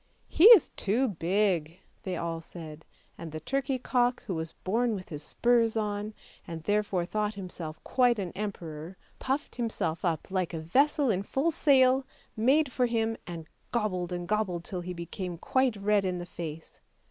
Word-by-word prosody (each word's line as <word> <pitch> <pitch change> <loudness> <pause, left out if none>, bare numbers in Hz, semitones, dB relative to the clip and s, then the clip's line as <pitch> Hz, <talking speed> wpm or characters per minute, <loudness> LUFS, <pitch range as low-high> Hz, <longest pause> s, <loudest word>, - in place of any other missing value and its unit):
" - - -39
He 340 - +9
is 450 -7 +10
too 235 +6 0
big," 175 -2 0 0.2
they 185 -2 -3
all 165 -1 -3
said; 160 -2 -10 0.3
and 165 -2 -7
the 155 - -5
turkey 270 - -1
cock, 245 0 +1
who 190 - -3
was 160 -1 -4
born 230 +4 0
with 185 -2 -8
his 150 -2 -6
spurs 230 +6 +2
on, 210 0 -2 0.3
and 165 -1 -6
therefore 205 -2 0
thought 210 +2 -2
himself 175 -5 -7
quite 245 -2 +3
an 190 -4 -3
emperor, 175 -4 -6 0.2
puffed 265 +1 -2
himself 220 -9 -2
up 170 -1 -1
like 185 -3 -1
a - - -3
vessel 275 - +2
in 190 -2 0
full 270 +10 0
sail, 270 -4 +4 0.3
made 270 +6 +3
for 250 -1 +1
him, 225 -1 0
and 170 -2 -6 0.3
gobbled 185 -6 -1
and 175 -1 -4
gobbled 190 -4 0
till 180 0 -4
he 180 +1 -5
became 170 +1 -5
quite 260 +6 +1
red 205 0 +2
in 185 -1 -1
the 175 - -5
face. 165 -2 -8
200 Hz, 175 wpm, -29 LUFS, 170-240 Hz, 0.3 s, is